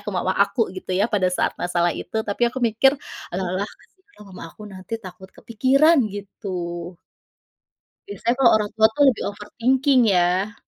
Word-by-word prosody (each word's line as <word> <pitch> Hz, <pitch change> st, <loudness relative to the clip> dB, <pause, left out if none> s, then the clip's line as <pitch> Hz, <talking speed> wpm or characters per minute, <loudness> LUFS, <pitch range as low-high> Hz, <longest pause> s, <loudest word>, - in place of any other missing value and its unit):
ke 205 Hz, 0 st, -6 dB
mama 185 Hz, +1 st, 0 dB
aku 200 Hz, +3 st, +1 dB
gitu 185 Hz, 0 st, -8 dB
ya 200 Hz, -, +2 dB
pada 185 Hz, -3 st, +2 dB
saat -, -, 0 dB
masalah 175 Hz, -1 st, 0 dB
itu 200 Hz, -, -7 dB
tapi 205 Hz, +3 st, -4 dB
aku 245 Hz, -, -14 dB
mikir, 235 Hz, +5 st, +3 dB, 0.4 s
alah 190 Hz, -, -2 dB, 0.2 s
alah 205 Hz, -, -3 dB
kasihan 375 Hz, -, -20 dB
mama 185 Hz, -, -10 dB
aku 210 Hz, -, -15 dB
nanti 190 Hz, +1 st, -12 dB
takut 190 Hz, -3 st, -12 dB
kepikiran 270 Hz, +11 st, +2 dB
gitu. 180 Hz, -4 st, -6 dB, 1.1 s
Biasanya 225 Hz, +4 st, -1 dB
kalau 250 Hz, -3 st, +6 dB
orang 210 Hz, -1 st, -2 dB
tua 220 Hz, 0 st, +6 dB
itu 290 Hz, -, -8 dB
lebih 245 Hz, -, 0 dB
overthinking 255 Hz, +6 st, +1 dB
ya. 185 Hz, +4 st, +1 dB
205 Hz, 165 wpm, -22 LUFS, 185-235 Hz, 1.1 s, kalau